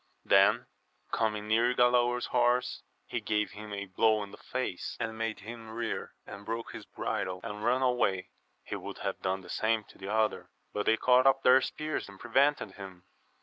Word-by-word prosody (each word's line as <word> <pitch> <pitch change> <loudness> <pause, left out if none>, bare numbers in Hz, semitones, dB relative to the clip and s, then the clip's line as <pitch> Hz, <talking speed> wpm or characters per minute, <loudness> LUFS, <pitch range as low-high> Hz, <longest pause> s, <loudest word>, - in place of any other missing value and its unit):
Then - - +5 0.5
coming 105 -2 0
near 115 +3 +3
Galaor's 125 0 +3
horse, 125 0 +1 0.2
he - - -3
gave 105 -2 0
him 105 +1 -9
a 100 0 -4
blow 110 +2 +2
in 100 - -9
the - - -11
face, 130 -8 -4
and 115 -1 -3
made 115 -1 -3
him 115 +1 -9
rear 115 0 -4
and 100 - -9
break 115 +2 -4
his - - -9
bridle, 90 0 -3
and 105 -2 -6
run 125 +3 +2
away. 115 -8 +1 0.3
He - - -5
would - - -7
have - - -2
done 95 0 -1
the 90 - -14
same 110 0 +1
to - - -17
the 95 +1 -5
other, 110 0 0 0.2
but 105 - -2
they 110 - +5
caught 125 +2 +5
up 135 0 +4
their 130 +1 +7
spears 155 -6 -3
and 100 -1 -13
prevented 135 -2 +2
him. 95 -3 -10
110 Hz, 190 wpm, -30 LUFS, 105-125 Hz, 0.5 s, their